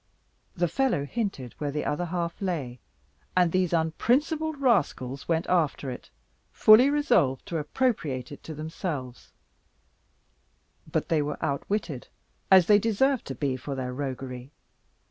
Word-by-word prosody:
The 175 Hz, 0 st, +1 dB
fellow 230 Hz, -, 0 dB
hinted 170 Hz, -, -4 dB
where 145 Hz, -, -2 dB
the 150 Hz, +1 st, -3 dB
other 175 Hz, +4 st, -1 dB
half 170 Hz, 0 st, -3 dB
lay, 145 Hz, -10 st, -3 dB, 0.6 s
and 175 Hz, -2 st, +4 dB
these 185 Hz, -1 st, +1 dB
unprincipled 275 Hz, -, +1 dB
rascals 145 Hz, -, 0 dB
went 165 Hz, 0 st, +1 dB
after 155 Hz, -6 st, 0 dB
it, 125 Hz, -, -9 dB, 0.4 s
fully 225 Hz, +6 st, +7 dB
resolved 245 Hz, -, +2 dB
to 170 Hz, -5 st, -3 dB
appropriate 150 Hz, -, -1 dB
it 145 Hz, -, -9 dB
to 160 Hz, -, -6 dB
themselves; 150 Hz, -4 st, -5 dB, 1.6 s
but -, -, -1 dB
they 160 Hz, -2 st, +2 dB
were 145 Hz, 0 st, -3 dB
outwitted, 155 Hz, -, -2 dB, 0.4 s
as 190 Hz, -2 st, +7 dB
they 205 Hz, +2 st, +6 dB
deserved 235 Hz, +5 st, +1 dB
to 135 Hz, -, -5 dB
be 135 Hz, 0 st, -1 dB
for 135 Hz, +2 st, -5 dB
their 125 Hz, -1 st, -4 dB
roguery. 130 Hz, -1 st, -5 dB
160 Hz, 135 wpm, -27 LUFS, 140-205 Hz, 1.6 s, fully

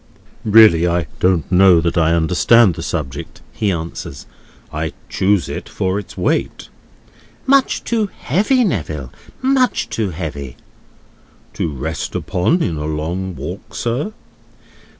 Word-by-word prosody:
"Really 105 Hz, -6 st, +6 dB
I 85 Hz, -1 st, 0 dB
don't 90 Hz, -2 st, +1 dB
know 90 Hz, -1 st, +6 dB
that 85 Hz, +2 st, -1 dB
I 85 Hz, -1 st, +3 dB
understand 90 Hz, +6 st, +4 dB
the -, -, -7 dB
subject," 65 Hz, -3 st, -5 dB
he 105 Hz, -2 st, 0 dB
answers. 80 Hz, -5 st, -6 dB, 0.5 s
"I 80 Hz, +1 st, -3 dB, 0.2 s
chose 100 Hz, -1 st, +1 dB
it -, -, -6 dB
for 95 Hz, +2 st, -1 dB
its 105 Hz, -, -11 dB
weight." -, -, -1 dB, 0.8 s
"Much 275 Hz, 0 st, +3 dB
too 225 Hz, -3 st, 0 dB
heavy, 210 Hz, -, +1 dB
Neville; 75 Hz, -, -3 dB, 0.3 s
much 255 Hz, -, +2 dB
too 110 Hz, -3 st, -1 dB
heavy." 75 Hz, -7 st, -6 dB, 1.0 s
"To -, -, -2 dB
rest 75 Hz, +4 st, -4 dB
upon 160 Hz, -, +1 dB
in 80 Hz, -, -2 dB
a 75 Hz, -, -4 dB
long 85 Hz, +5 st, -3 dB
walk, -, -, -7 dB
sir?" 125 Hz, -, -2 dB
90 Hz, 130 wpm, -18 LUFS, 80-115 Hz, 1.0 s, Really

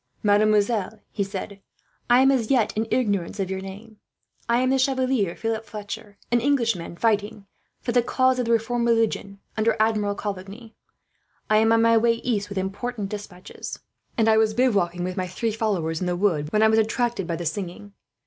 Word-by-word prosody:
"Mademoiselle," 210 Hz, 0 st, +2 dB
he 200 Hz, -, -1 dB
said, 195 Hz, 0 st, -6 dB, 0.5 s
"I 245 Hz, +1 st, +6 dB
am 270 Hz, +1 st, +5 dB
as 240 Hz, -5 st, 0 dB
yet 240 Hz, -6 st, +2 dB
in 220 Hz, +1 st, -1 dB
ignorance 205 Hz, -6 st, 0 dB
of 190 Hz, -1 st, -2 dB
your 190 Hz, 0 st, -3 dB
name. 205 Hz, +3 st, -10 dB, 0.5 s
I 235 Hz, -, +4 dB
am 255 Hz, 0 st, +2 dB
the 270 Hz, -, +2 dB
Chevalier 260 Hz, -8 st, +1 dB
Philip 225 Hz, -1 st, -2 dB
Fletcher, 210 Hz, -1 st, -8 dB
an 240 Hz, -1 st, +3 dB
English 250 Hz, -4 st, +2 dB
gentleman 170 Hz, -1 st, -8 dB
fighting 210 Hz, -1 st, 0 dB, 0.4 s
for 240 Hz, -, -2 dB
the 245 Hz, +1 st, +4 dB
cause 255 Hz, +1 st, +2 dB
of 250 Hz, -, 0 dB
the 230 Hz, -, 0 dB
reformed 235 Hz, +1 st, +1 dB
religion, 225 Hz, -3 st, 0 dB, 0.2 s
under 220 Hz, +1 st, +2 dB
Admiral 215 Hz, -2 st, +1 dB
Coligny. 205 Hz, +3 st, -7 dB, 0.8 s
I 215 Hz, -, +6 dB
am 225 Hz, +1 st, +4 dB
on 225 Hz, 0 st, +4 dB
my 230 Hz, 0 st, +5 dB
way 230 Hz, +1 st, +4 dB
east, 225 Hz, -3 st, -2 dB
with 200 Hz, -, -6 dB
important 200 Hz, +3 st, -3 dB
despatches; 200 Hz, -3 st, -8 dB, 0.4 s
and 225 Hz, -1 st, +3 dB
I 220 Hz, 0 st, +5 dB
was 220 Hz, -1 st, +2 dB
bivouacking 200 Hz, -8 st, +1 dB
with 185 Hz, 0 st, -4 dB
my 185 Hz, -1 st, -1 dB
three 225 Hz, +5 st, -2 dB
followers 190 Hz, -7 st, -1 dB
in 180 Hz, -, -1 dB
the 180 Hz, -, 0 dB
wood, 165 Hz, -6 st, 0 dB
when 215 Hz, 0 st, +3 dB
I -, -, +7 dB
was 220 Hz, 0 st, +4 dB
attracted 220 Hz, -3 st, 0 dB
by 170 Hz, -, -1 dB
the 170 Hz, +1 st, -5 dB
singing. 195 Hz, +4 st, -5 dB
215 Hz, 195 wpm, -24 LUFS, 195-230 Hz, 0.8 s, I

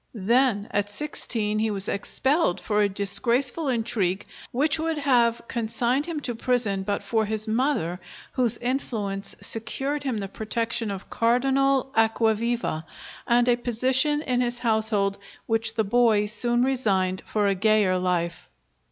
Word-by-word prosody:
Then 225 Hz, 0 st, +2 dB
at 205 Hz, 0 st, 0 dB
sixteen 215 Hz, -3 st, -2 dB
he 220 Hz, 0 st, +1 dB
was 200 Hz, -1 st, -3 dB
expelled 265 Hz, -, 0 dB
for 210 Hz, -1 st, 0 dB
a 205 Hz, -, +3 dB
disgraceful 235 Hz, +10 st, 0 dB
intrigue, 210 Hz, -6 st, 0 dB, 0.3 s
which 295 Hz, +5 st, +1 dB
would 320 Hz, 0 st, -1 dB
have 240 Hz, -5 st, +2 dB
consigned 240 Hz, +5 st, -1 dB
him 330 Hz, -3 st, -3 dB
to 245 Hz, -, -3 dB
prison 230 Hz, -4 st, 0 dB
but 200 Hz, +1 st, -2 dB
for 220 Hz, -2 st, 0 dB
his 215 Hz, +1 st, -3 dB
mother, 220 Hz, -, 0 dB, 0.3 s
whose 245 Hz, -4 st, +1 dB
influence 215 Hz, -6 st, -3 dB
secured 270 Hz, +6 st, -2 dB
him 260 Hz, -5 st, -2 dB
the 200 Hz, -1 st, -3 dB
protection 225 Hz, +2 st, -2 dB
of 195 Hz, -1 st, -7 dB
Cardinal 270 Hz, +3 st, +2 dB
Acquaviva 225 Hz, -4 st, +1 dB, 0.4 s
and 240 Hz, +1 st, +3 dB
a 245 Hz, -, +5 dB
position 260 Hz, +5 st, +1 dB
in 250 Hz, -1 st, 0 dB
his 240 Hz, 0 st, -1 dB
household, 220 Hz, -4 st, +1 dB, 0.3 s
which 225 Hz, 0 st, 0 dB
the 220 Hz, -, +2 dB
boy 215 Hz, -1 st, +3 dB
soon 240 Hz, +3 st, 0 dB
resigned 195 Hz, -8 st, +1 dB
for 210 Hz, -1 st, 0 dB
a 200 Hz, -, +3 dB
gayer 200 Hz, -2 st, +2 dB
life. 175 Hz, -2 st, -2 dB
230 Hz, 145 wpm, -25 LUFS, 205-250 Hz, 0.4 s, a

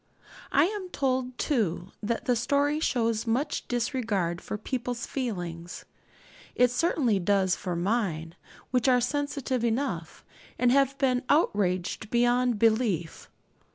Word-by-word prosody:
I 285 Hz, -, +5 dB
am 390 Hz, -1 st, -4 dB
told, 255 Hz, -4 st, -1 dB
too, 195 Hz, -, -1 dB
that 230 Hz, +2 st, -2 dB
the 250 Hz, -, +2 dB
story 285 Hz, +5 st, +1 dB
shows 230 Hz, -6 st, 0 dB
much 265 Hz, +6 st, -1 dB
disregard 225 Hz, -8 st, -1 dB
for -, -, -5 dB
people's 245 Hz, +2 st, -3 dB
feelings. 175 Hz, -9 st, -5 dB, 0.7 s
It 250 Hz, -1 st, +4 dB
certainly 250 Hz, -, +1 dB
does 190 Hz, 0 st, +2 dB
for 180 Hz, -2 st, -4 dB
mine, 170 Hz, -4 st, -1 dB, 0.4 s
which 250 Hz, 0 st, +2 dB
are 250 Hz, -1 st, +5 dB
sensitive 270 Hz, -1 st, -1 dB
enough, 225 Hz, -, -2 dB, 0.3 s
and 245 Hz, 0 st, +3 dB
have 275 Hz, 0 st, +3 dB
been 255 Hz, -3 st, +2 dB
outraged 200 Hz, -, +1 dB
beyond 245 Hz, 0 st, +2 dB
belief. 215 Hz, -7 st, +1 dB
240 Hz, 120 wpm, -27 LUFS, 200-260 Hz, 0.7 s, I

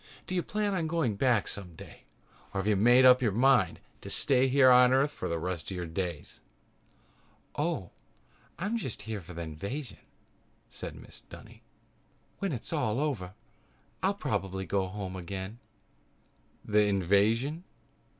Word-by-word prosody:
"Do -, -, -6 dB
you 180 Hz, -, +1 dB
plan 210 Hz, +2 st, -1 dB
on 170 Hz, -4 st, -1 dB
going 155 Hz, -10 st, 0 dB
back 120 Hz, -1 st, +2 dB
someday 90 Hz, -5 st, -9 dB, 0.5 s
or -, -, 0 dB
have 95 Hz, -, -2 dB
you 105 Hz, -, +3 dB
made 120 Hz, +6 st, +6 dB
up 125 Hz, 0 st, +7 dB
your 115 Hz, -4 st, +2 dB
mind 120 Hz, -4 st, +3 dB, 0.2 s
to -, -, -8 dB
stay 135 Hz, -2 st, +3 dB
here 130 Hz, 0 st, +6 dB
on 125 Hz, 0 st, +7 dB
Earth 135 Hz, +3 st, +3 dB
for -, -, -5 dB
the 85 Hz, -, -1 dB
rest 90 Hz, 0 st, -4 dB
of 95 Hz, -, -5 dB
your 90 Hz, -, -3 dB
days?" 85 Hz, -2 st, -5 dB, 1.2 s
"Oh, 150 Hz, -, -2 dB, 0.7 s
I'm 205 Hz, +6 st, -1 dB
just 130 Hz, -, -5 dB
here 110 Hz, -1 st, -5 dB
for 90 Hz, +1 st, -11 dB
the 85 Hz, -, -4 dB
invasion," 100 Hz, -, -6 dB, 0.7 s
said -, -, -7 dB
Mrs. -, -, -13 dB
Dunny. -, -, -13 dB, 0.8 s
"When -, -, -1 dB
that's -, -, -3 dB
over 110 Hz, -5 st, -1 dB, 0.7 s
I'll -, -, +1 dB
probably 95 Hz, 0 st, -3 dB
go 95 Hz, -1 st, 0 dB
back 95 Hz, -, -10 dB
home 95 Hz, -3 st, -5 dB
again." 95 Hz, +4 st, -6 dB, 1.1 s
"The 105 Hz, 0 st, +3 dB
invasion?" 105 Hz, -, +2 dB
105 Hz, 150 wpm, -29 LUFS, 95-135 Hz, 1.2 s, up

